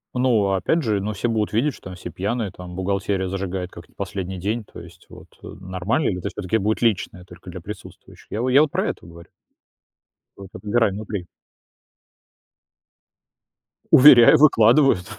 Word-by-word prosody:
Ну, 120 -6 +2
опять 145 - 0
же, 105 -4 -1
ну, 105 +2 -3
все 105 +3 -2
будут 110 -3 -2
видеть, 130 +6 +1
что - - -16
там 90 - -9
все 95 - -9
пьяные, 105 +1 -3
там, 90 -1 -11
бухгалтерия 95 0 -2
зажигает 95 -1 -4
как 85 -1 -13
не - - -30
последний 95 -1 -5
день, 105 +6 -3
то - - -13
есть - - -15
вот, - - -14 0.2
э, - - -11
нормально? 95 - -2
Или 90 -2 -3
тоже - - -6
всё-таки 105 +2 -1
будет 110 +3 -1
личное, 90 -5 -1
только 90 0 -14
для 90 +1 -8
присутствующих? 105 +4 -12
Я 110 - -3
во 130 - 0
я 140 +3 +6
вот 155 - +2
про - - -2
это - - -8
говорю. 85 0 -14 1.1
Только 100 -1 -11
добирай 110 0 +1
внутри. 100 -2 -6 2.7
Уверяю, 125 -3 +8
выкладывают. 125 -6 +4
100 Hz, 170 wpm, -22 LUFS, 95-115 Hz, 2.7 s, Уверяю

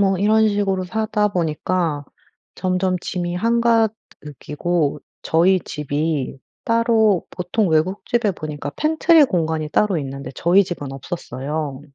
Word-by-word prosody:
뭐 195 -2 +2
이런 215 +3 +4
식으로 195 -2 0
사다 210 +2 0
보니까 165 -3 -1 0.5
점점 185 0 0
짐이 175 -1 -3
한가득이고 180 - 0 0.2
저희 180 +4 +3
집이 150 -2 -3 0.3
따로 225 -4 +2
보통 180 +3 -1
외국 165 +5 +1
집에 235 -4 +1
보니까 150 -4 -6
pantry 315 - +4
공간이 160 -6 -1
따로 205 +1 +2
있는데 135 -2 -6
저희 185 +7 +4
집은 145 -7 -6
없었어요. 140 -1 -5
180 Hz, 285 characters per minute, -21 LUFS, 155-210 Hz, 0.5 s, 이런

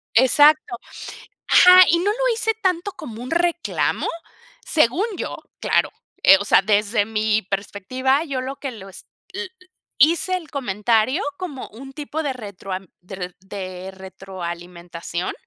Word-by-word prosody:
Exacto. 290 +2 +5 0.7
Ajá, 365 0 +9
¿y 340 - +4
no 380 +4 +1
lo - - 0
hice 445 0 0
tanto 370 +1 0
como 230 -8 -9
un 250 - -7
reclamo? 345 0 0 0.6
Según 310 - +2
yo, - - -4 0.2
claro, - - +1 0.3
eh, 195 - +8
o - - -2
sea, 195 - +4
desde 210 +1 +2
mi 215 0 0
perspectiva, 205 - -1
yo 270 -4 -3
lo 265 +2 -5
que 275 - -5
los 195 -4 -11 0.3
l 380 0 -4
l 375 - -10 0.5
hice 335 +6 +3
el 330 -5 -9
comentario 225 0 0 0.2
como 310 -8 -6
un 270 +5 -11
tipo 300 +2 -4
de 285 -3 -1
retroam 195 -4 -7
de 185 +2 -11
reto 180 -1 -7
de 190 -1 -7
retroalimentación, 175 -2 -7
235 Hz, 145 wpm, -21 LUFS, 195-310 Hz, 0.7 s, Ajá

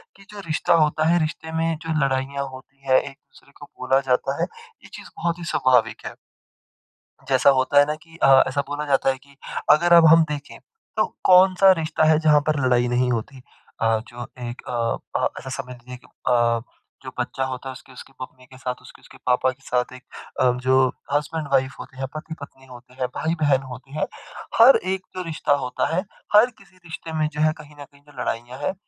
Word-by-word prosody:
कि 195 - -17
जो 210 - -9
रिश्ता 155 +2 +1
होता 150 +1 0
है 175 0 +4
रिश्ते 160 +1 -4
में 165 0 0
जो 160 - -1
लड़ाइयाँ 135 +1 -2
होती 130 +1 -14
हैं 130 0 +5
एक-दूसरे 135 - -14
को - - -10
बोला 130 +1 +2
जाता 135 +2 0
है - - +1 0.4
यह - - -14
चीज़ - - -10
बहुत 170 0 -2
ही 170 - -7
स्वाभाविक 125 -3 +2
है। - - -6 1.1
जैसा 130 +1 +5
होता 130 +2 +3
है 145 - +6
ना 150 +1 -2
कि 165 +1 -19
अ, 135 -1 +7
ऐसा 140 - -1
बोला 150 +1 -3
जाता 135 -1 +2
है 130 - 0
कि 140 +1 -22 0.4
अगर 170 +3 +4
अब 170 -1 +8
हम 165 0 +6
देखें 145 -1 -6 0.4
तो - - +3 0.2
कौन-सा 185 +1 +6
रिश्ता 160 0 -1
है 155 - +5
जहाँ 150 -2 +4
पर 150 -2 +1
लड़ाई 125 -1 +3
नहीं 125 +1 +1
होती। 120 +3 -4 0.4
अ, 115 0 +3
जो 120 0 -8 0.2
एक 120 - -8
अ - - -5 0.5
अ, - - +3
ऐसा 130 - -8
समझ 125 0 -11
लीजिए 125 +1 -11
कि - - -22 0.2
अ, 120 -2 +2 0.4
जो - - -7
बच्चा 135 - -2
होता 130 0 -6
है - - -6
उसकी 130 0 -15
उसकी 130 - -13
मम्मी 130 0 -10
के 130 +1 -16
साथ, 125 -1 -4
उसके - - -16
उसके - - -17
पापा 125 +1 +2
के 130 +2 -18
साथ 125 -1 -1
एक 125 - -12 0.4
अ, 125 - +4
जो 130 0 +4 0.3
हसबैंड-वाइफ़ 145 -3 0
होते 135 - -11
हैं, 135 0 -3
पति-पत्नी 155 -4 -9
होते 125 0 -15
हैं, 130 -1 -2
भाई-बहन 155 -4 +1
होते 130 +2 -13
हैं। - - +1 0.5
हर 250 +4 +9
एक 190 0 -3
जो 185 - -3
रिश्ता 155 -2 0
होता 130 0 -1
है, 185 - +1 0.3
हर 230 +4 +7
किसी 195 -2 -21
रिश्ते 160 0 -8
में 155 - +2
जो 150 - -3
है 155 0 +4
कहीं 150 0 -16
न 145 - -7
कहीं 140 0 -23
जो 145 -3 -10
लड़ाइयाँ 120 +3 -4
हैं 145 - -1
135 Hz, 210 wpm, -23 LUFS, 130-155 Hz, 1.1 s, हर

